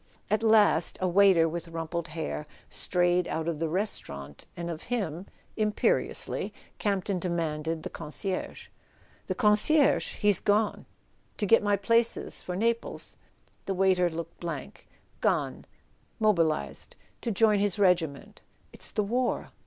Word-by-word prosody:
At 215 Hz, -, +2 dB
last 220 Hz, -2 st, +4 dB
a 185 Hz, -, 0 dB
waiter 185 Hz, -2 st, +5 dB
with 170 Hz, +1 st, -5 dB
rumpled 165 Hz, 0 st, -4 dB
hair 155 Hz, -2 st, -5 dB, 0.2 s
strayed 175 Hz, 0 st, +2 dB
out 160 Hz, 0 st, -3 dB
of 165 Hz, -3 st, -2 dB
the 165 Hz, -1 st, -1 dB
restaurant, 75 Hz, -, -4 dB
and 170 Hz, 0 st, -4 dB
of 165 Hz, -2 st, -6 dB
him, 195 Hz, -7 st, -3 dB, 0.3 s
imperiously, 215 Hz, -1 st, 0 dB, 0.3 s
Campton 195 Hz, -2 st, 0 dB
demanded 165 Hz, -2 st, -2 dB
the -, -, -4 dB
con¬ 150 Hz, -2 st, -8 dB
cierge. 190 Hz, +3 st, -4 dB, 0.6 s
"The -, -, -2 dB
concierge? 250 Hz, +6 st, +3 dB
He's 205 Hz, -3 st, +3 dB
gone." 210 Hz, +1 st, +1 dB, 0.5 s
"To 210 Hz, -, -1 dB
get 230 Hz, +3 st, +5 dB
my 205 Hz, 0 st, +2 dB
places 230 Hz, +4 st, 0 dB
for 180 Hz, -, -5 dB
Naples?" 230 Hz, +4 st, -1 dB, 0.5 s
The 195 Hz, -, -2 dB
waiter 185 Hz, -1 st, +3 dB
looked 165 Hz, 0 st, -7 dB
blank. 170 Hz, -1 st, -6 dB, 0.3 s
"Gone: -, -, 0 dB, 0.5 s
mobilised—to 165 Hz, -, -1 dB
join 215 Hz, 0 st, +3 dB
his 205 Hz, -1 st, +1 dB
regiment. 175 Hz, -8 st, +1 dB, 0.3 s
It's -, -, -1 dB
the 210 Hz, -, -1 dB
war." 245 Hz, +4 st, -1 dB
185 Hz, 130 wpm, -28 LUFS, 165-210 Hz, 0.6 s, waiter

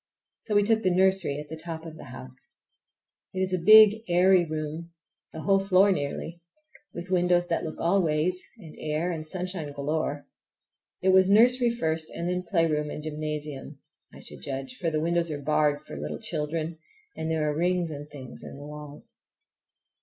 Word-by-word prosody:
So 210 Hz, -, -3 dB
we 205 Hz, -, +5 dB
took 220 Hz, +1 st, +2 dB
the 185 Hz, -, +2 dB
nursery, 190 Hz, -5 st, +2 dB
at 150 Hz, -, -8 dB
the 160 Hz, -, -7 dB
top 165 Hz, -1 st, -6 dB
of 160 Hz, -1 st, -8 dB
the -, -, -11 dB
house. 130 Hz, 0 st, -9 dB, 0.9 s
It -, -, -2 dB
is 190 Hz, 0 st, 0 dB
a 185 Hz, -, +1 dB
big, 215 Hz, +1 st, +8 dB
airy 180 Hz, +1 st, +5 dB
room, 155 Hz, +1 st, -5 dB, 0.4 s
the 160 Hz, -, -7 dB
whole 195 Hz, +3 st, +3 dB
floor 195 Hz, +1 st, +4 dB
nearly, 160 Hz, +2 st, -3 dB, 0.5 s
with 175 Hz, +2 st, -8 dB
windows 175 Hz, -1 st, +3 dB
that 165 Hz, -, 0 dB
look 155 Hz, -, -5 dB
all 185 Hz, +4 st, +2 dB
ways, 170 Hz, +3 st, 0 dB
and 165 Hz, -8 st, -12 dB
air 155 Hz, +3 st, -1 dB
and 160 Hz, -2 st, -4 dB
sunshine 175 Hz, -2 st, -5 dB
galore. 145 Hz, 0 st, -2 dB, 0.8 s
It 190 Hz, -, +3 dB
was 190 Hz, 0 st, +5 dB
nursery 240 Hz, +4 st, +5 dB
first 160 Hz, -9 st, -1 dB
and 170 Hz, -, -4 dB
then 180 Hz, 0 st, -1 dB
playground 165 Hz, -4 st, 0 dB
and 150 Hz, -, -6 dB
gymnasium, 150 Hz, -2 st, -5 dB, 0.3 s
I -, -, -13 dB
should 75 Hz, -2 st, -9 dB
judge; 135 Hz, -, -5 dB
for 165 Hz, -, -1 dB
the 155 Hz, -1 st, -1 dB
windows 170 Hz, +1 st, 0 dB
are 150 Hz, -2 st, -4 dB
barred 145 Hz, 0 st, +1 dB
for -, -, -9 dB
little 75 Hz, +1 st, -5 dB
children, 160 Hz, +2 st, -3 dB, 0.4 s
and 160 Hz, -, -4 dB
there 160 Hz, -1 st, 0 dB
are 150 Hz, -, -1 dB
rings 175 Hz, 0 st, 0 dB
and 145 Hz, 0 st, -8 dB
things 130 Hz, -4 st, -10 dB
in -, -, -9 dB
the 145 Hz, -, -9 dB
walls. 150 Hz, 0 st, -10 dB
160 Hz, 185 wpm, -27 LUFS, 150-185 Hz, 0.9 s, big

